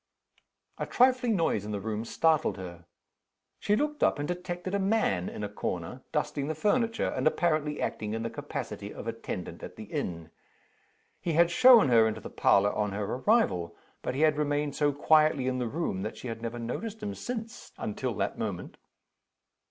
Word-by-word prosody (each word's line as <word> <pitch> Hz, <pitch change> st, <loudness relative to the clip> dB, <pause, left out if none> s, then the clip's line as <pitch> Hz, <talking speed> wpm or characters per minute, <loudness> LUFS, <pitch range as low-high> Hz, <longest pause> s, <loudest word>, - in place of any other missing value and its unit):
A -, -, -2 dB
trifling 250 Hz, -2 st, +3 dB
noise 160 Hz, -, +1 dB
in 105 Hz, -, -6 dB
the 100 Hz, -, -2 dB
room 110 Hz, +2 st, -3 dB
startled 160 Hz, +2 st, +2 dB
her. 85 Hz, -2 st, -9 dB, 0.7 s
She 210 Hz, -, +2 dB
looked 300 Hz, +5 st, -1 dB
up, -, -, +3 dB
and 145 Hz, 0 st, -3 dB
detected 180 Hz, +1 st, -4 dB
a 200 Hz, -, +1 dB
man 190 Hz, -, +1 dB
in -, -, -6 dB
a -, -, -1 dB
corner, 100 Hz, +3 st, -4 dB
dusting 150 Hz, -2 st, -1 dB
the 155 Hz, -, -2 dB
furniture, 225 Hz, +6 st, +1 dB
and -, -, 0 dB
apparently 155 Hz, -2 st, +1 dB
acting 105 Hz, 0 st, -2 dB
in 115 Hz, -, -3 dB
the 115 Hz, -, -3 dB
capacity -, -, -5 dB
of -, -, -8 dB
attendant -, -, -5 dB
at -, -, -8 dB
the -, -, -8 dB
inn. 85 Hz, -2 st, -4 dB, 0.9 s
He 170 Hz, -, -2 dB
had 170 Hz, +2 st, +4 dB
shown 245 Hz, -, +7 dB
her 115 Hz, -2 st, +6 dB
into 110 Hz, 0 st, -3 dB
the -, -, -9 dB
parlor 100 Hz, +1 st, +3 dB
on 105 Hz, -2 st, -1 dB
her 105 Hz, +1 st, -2 dB
arrival; 125 Hz, -, +1 dB, 0.3 s
but 125 Hz, -, -3 dB
he 140 Hz, -, -1 dB
had 155 Hz, -1 st, +4 dB
remained 145 Hz, -1 st, 0 dB
so 145 Hz, -1 st, +2 dB
quietly 155 Hz, -1 st, +3 dB
in 130 Hz, 0 st, 0 dB
the 125 Hz, -, -1 dB
room 125 Hz, -, -2 dB
that 105 Hz, +2 st, -5 dB
she 125 Hz, -, -6 dB
had 115 Hz, 0 st, -6 dB
never 115 Hz, +1 st, -4 dB
noticed 210 Hz, -, -5 dB
him 205 Hz, -1 st, -3 dB
since, 230 Hz, -1 st, -6 dB
until -, -, -3 dB
that -, -, -2 dB
moment. -, -, -4 dB
145 Hz, 185 wpm, -29 LUFS, 110-185 Hz, 0.9 s, shown